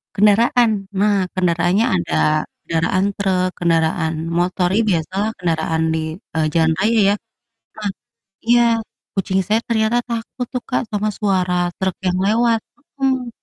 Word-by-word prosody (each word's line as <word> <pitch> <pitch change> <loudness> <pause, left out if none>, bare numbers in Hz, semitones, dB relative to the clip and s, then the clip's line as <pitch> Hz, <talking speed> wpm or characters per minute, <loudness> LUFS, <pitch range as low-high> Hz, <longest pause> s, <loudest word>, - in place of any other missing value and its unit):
kendaraan. 225 +4 +4 0.3
Nah, 200 -2 +2
kendaraannya 180 +3 +2
ada 85 -2 -1 0.5
kendaraan 165 +3 0
truk, 185 -2 +1
kendaraan 165 -1 +1 0.3
motor, 180 +1 +1
ya, 225 - +4
biasalah 190 +4 0
kendaraan 160 -2 -1
di, 160 - 0 0.4
eee, 160 -1 +2
jalan 160 -1 +3
raya 220 +4 +2
ya. - - +2 1.1
Nah 195 +2 -37
iya, 240 0 +6 0.5
kucing 190 -1 0
saya 215 +4 +1
ternyata 220 0 +2
takut 235 +2 -4
tuh 250 -1 -3
Kak, 255 - +1
sama 210 0 0
suara 190 -4 0 0.2
truk 190 -1 -1
yang 180 0 +1
lewat 230 +2 +3 0.4
mhm, 260 -2 0
195 Hz, 135 wpm, -19 LUFS, 175-225 Hz, 1.1 s, iya